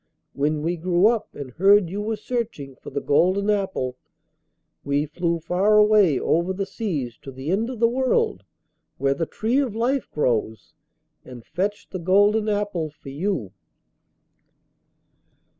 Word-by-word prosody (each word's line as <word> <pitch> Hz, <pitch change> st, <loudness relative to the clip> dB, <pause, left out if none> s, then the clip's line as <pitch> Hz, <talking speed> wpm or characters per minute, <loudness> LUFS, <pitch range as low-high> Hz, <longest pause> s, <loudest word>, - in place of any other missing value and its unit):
When 150 Hz, +2 st, -1 dB
we 170 Hz, +2 st, -1 dB
grew 175 Hz, +2 st, +2 dB
up 230 Hz, -2 st, -2 dB
and 140 Hz, -3 st, -7 dB
heard 195 Hz, +5 st, +4 dB
you 200 Hz, +2 st, -3 dB
were 220 Hz, +1 st, -2 dB
searching 215 Hz, -, -4 dB
for -, -, -11 dB
the 140 Hz, -, -3 dB
golden 185 Hz, +8 st, +2 dB
apple, 190 Hz, -11 st, -2 dB, 0.9 s
we 140 Hz, +1 st, 0 dB
flew 170 Hz, +3 st, -1 dB
far 185 Hz, +6 st, +2 dB
away 210 Hz, -9 st, +5 dB
over 170 Hz, +3 st, +1 dB
the 195 Hz, +1 st, -3 dB
seas 170 Hz, -, -4 dB
to 135 Hz, -, -9 dB
the 135 Hz, +5 st, -5 dB
end 220 Hz, +5 st, 0 dB
of 250 Hz, -4 st, -6 dB
the 230 Hz, -, +5 dB
world, 265 Hz, -, 0 dB, 0.5 s
where 135 Hz, 0 st, +1 dB
the 160 Hz, +3 st, -3 dB
tree 235 Hz, +5 st, 0 dB
of 255 Hz, -7 st, -1 dB
life 250 Hz, +4 st, 0 dB
grows, 115 Hz, -6 st, -1 dB, 0.5 s
and 125 Hz, -3 st, -11 dB
fetched 205 Hz, +3 st, -3 dB
the 185 Hz, -, -4 dB
golden 205 Hz, +5 st, +3 dB
apple 205 Hz, -6 st, -1 dB
for 145 Hz, -1 st, -13 dB
you. 145 Hz, -, -2 dB
185 Hz, 150 wpm, -23 LUFS, 145-210 Hz, 0.9 s, away